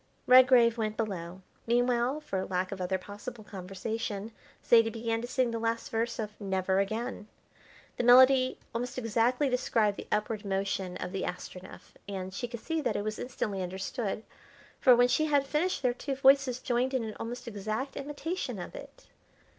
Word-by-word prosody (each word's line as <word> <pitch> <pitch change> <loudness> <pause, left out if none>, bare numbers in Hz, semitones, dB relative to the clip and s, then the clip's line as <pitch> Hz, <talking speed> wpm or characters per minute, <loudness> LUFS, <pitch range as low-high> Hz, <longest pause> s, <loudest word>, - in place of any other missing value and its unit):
Redgrave 250 -2 +6
went 215 -1 -2
below. 185 -4 -4 0.2
Meanwhile, 245 +4 +2
for 195 -11 -3
lack 185 0 -2
of 195 -2 -5
other 185 +1 0
possible 210 +5 -9
conversation, 200 +2 -5 0.3
Zaidie 230 -1 +6
began 225 0 -2
to 240 - -5
sing 250 -1 +1
the 230 - -2
last 230 0 -2
verse 230 +1 -1
of 215 -2 -3
"Never 190 -1 0
Again." 220 +2 -3 0.7
The - - 0
melody 255 +1 +6 0.2
almost 245 +2 -3
exactly 240 +4 +1
described 230 -5 +1
the - - -8
upward 210 0 -1
motion 195 -2 -2
of 180 - -5
the 195 -1 -3
Astronef, 180 +1 -7 0.2
and 190 -1 -5
she 245 +5 -3
could 235 -1 -8
see 325 -1 -2
that 260 - -1
it - - -1
was 215 0 -4
instantly 210 -6 -3
understood, 195 +4 -3 0.6
for 255 -2 +7
when 245 +1 +5
she 280 +5 +2
had 285 -2 +3
finished 300 +2 -1
their 250 -1 +3
two 270 +2 -4
voices 270 -1 +4
joined 255 +1 0
in 255 - 0
an 220 -1 -5
almost 245 +2 -6
exact 215 +5 -4
imitation 295 +6 -4
of - - -7
it. - - -11
230 Hz, 170 wpm, -30 LUFS, 200-255 Hz, 0.7 s, for